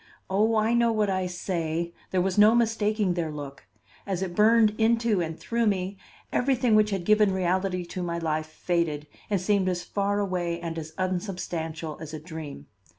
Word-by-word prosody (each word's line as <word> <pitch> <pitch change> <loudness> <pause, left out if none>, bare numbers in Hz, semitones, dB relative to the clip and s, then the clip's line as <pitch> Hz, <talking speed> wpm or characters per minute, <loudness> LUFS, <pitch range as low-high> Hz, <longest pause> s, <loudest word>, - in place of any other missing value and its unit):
Oh, 215 +4 +3
I 220 +2 +2
know 235 -1 +3
what 210 -3 +1
I 185 -1 0
say! 170 -2 -3 0.2
There 185 -1 +1
was 190 -1 0
no 210 +2 +6
mistaking 215 -4 +1
their 170 -2 -2
look. 140 -7 -8 0.4
As 190 -1 -1
it 180 -2 -4
burned 220 0 +5
into 230 -3 +3
and 160 -1 -4
through 235 -1 0
me, 190 -1 0 0.4
everything 250 -3 +2
which 215 0 +5
had 195 -4 -2
given 215 0 +4
reality 185 0 0
to 180 +1 -6
my 170 -1 -2
life 155 -2 -1
faded 155 -2 -1 0.2
and 200 -2 +1
seemed 190 0 +1
as 175 -1 -2
far 200 0 -1
away 180 -4 -1
and 165 -1 -4
as 155 0 -8
unsubstantial 175 -4 -3
as 160 -1 -6
a - - -6
dream. 155 - -8
185 Hz, 180 wpm, -26 LUFS, 170-210 Hz, 0.4 s, no